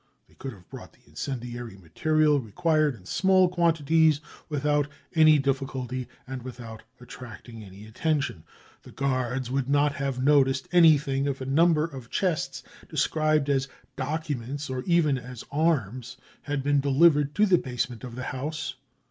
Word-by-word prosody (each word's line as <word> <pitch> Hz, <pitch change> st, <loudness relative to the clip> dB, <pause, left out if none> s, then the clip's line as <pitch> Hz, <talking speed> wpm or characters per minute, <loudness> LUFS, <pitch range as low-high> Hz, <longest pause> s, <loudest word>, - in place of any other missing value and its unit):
They -, -, -25 dB
could 135 Hz, -, -7 dB
have 90 Hz, -4 st, -17 dB
brought -, -, -11 dB
the -, -, -26 dB
incendiary 120 Hz, -5 st, -6 dB
material 150 Hz, -, +1 dB
re 115 Hz, -5 st, -9 dB
quired 155 Hz, -, +2 dB
in 95 Hz, -5 st, -17 dB
small 190 Hz, -, +3 dB
quantities 160 Hz, -3 st, +3 dB, 0.3 s
without 145 Hz, -1 st, +1 dB, 0.3 s
any 155 Hz, -2 st, +6 dB
difficulty 130 Hz, -2 st, -2 dB, 0.2 s
and 130 Hz, -1 st, -6 dB
without 120 Hz, -3 st, -9 dB, 0.2 s
attracting 120 Hz, -2 st, -11 dB
any 100 Hz, +1 st, -12 dB
attention. 130 Hz, -, -2 dB, 0.4 s
The -, -, -15 dB
guards 130 Hz, -2 st, -1 dB
would 135 Hz, 0 st, -1 dB
not 145 Hz, +1 st, +3 dB
have 140 Hz, -2 st, -3 dB
noticed 135 Hz, -1 st, +3 dB
anything 150 Hz, -5 st, +4 dB
if 135 Hz, -1 st, -2 dB
a 130 Hz, -, -5 dB
number 160 Hz, +2 st, +2 dB
oi 130 Hz, -, -6 dB
chests 180 Hz, -5 st, -1 dB, 0.3 s
described 155 Hz, -2 st, +1 dB
as 135 Hz, -1 st, +1 dB, 0.3 s
documents 145 Hz, -1 st, -4 dB
or 130 Hz, -1 st, -3 dB
even 160 Hz, -6 st, +3 dB
as 125 Hz, -1 st, -9 dB
" -, -, -34 dB
arms 130 Hz, -6 st, -1 dB
" -, -, -29 dB
had 145 Hz, -2 st, -1 dB
been 145 Hz, 0 st, +2 dB
delivered 145 Hz, +1 st, +3 dB
to 215 Hz, -, +4 dB
the 185 Hz, -4 st, +4 dB
basement 125 Hz, -2 st, -4 dB
of 120 Hz, -2 st, -7 dB
the 130 Hz, -, -5 dB
house. 150 Hz, +5 st, -4 dB
140 Hz, 155 wpm, -26 LUFS, 125-155 Hz, 0.4 s, any